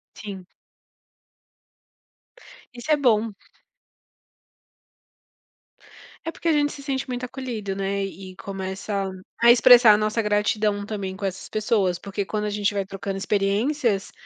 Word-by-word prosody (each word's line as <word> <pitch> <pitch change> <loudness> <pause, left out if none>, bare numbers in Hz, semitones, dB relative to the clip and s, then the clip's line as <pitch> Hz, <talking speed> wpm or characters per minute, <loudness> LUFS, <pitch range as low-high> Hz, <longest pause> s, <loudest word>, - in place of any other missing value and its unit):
Sim. 195 -4 -8 2.3
Isso 245 +6 -4
é 300 - +5
bom. 230 -5 +2 2.9
É, 330 - -2
porque 335 - -6
a 325 - +4
gente 290 -1 +2
se 285 - -10
sente 270 -1 -2
muito 250 -1 -3
acolhido, 235 -6 -5
né, 195 0 -1
e 195 -4 -8
e 185 - -16
começa 195 +1 -4 0.3
a 235 0 +8
expressar 240 -2 +8
a 210 - +4
nossa 215 +2 0
gratidão 210 -1 +1
também 200 -3 -4
com 200 - -10
essas 190 0 -4
pessoas, 210 -5 +1
porque 200 +1 -4
quando 210 +1 -2
a - - -1
gente 205 0 0
vai 200 -1 0
trocando 195 0 -5
experiências, 205 +3 0
210 Hz, 135 wpm, -24 LUFS, 195-240 Hz, 2.9 s, a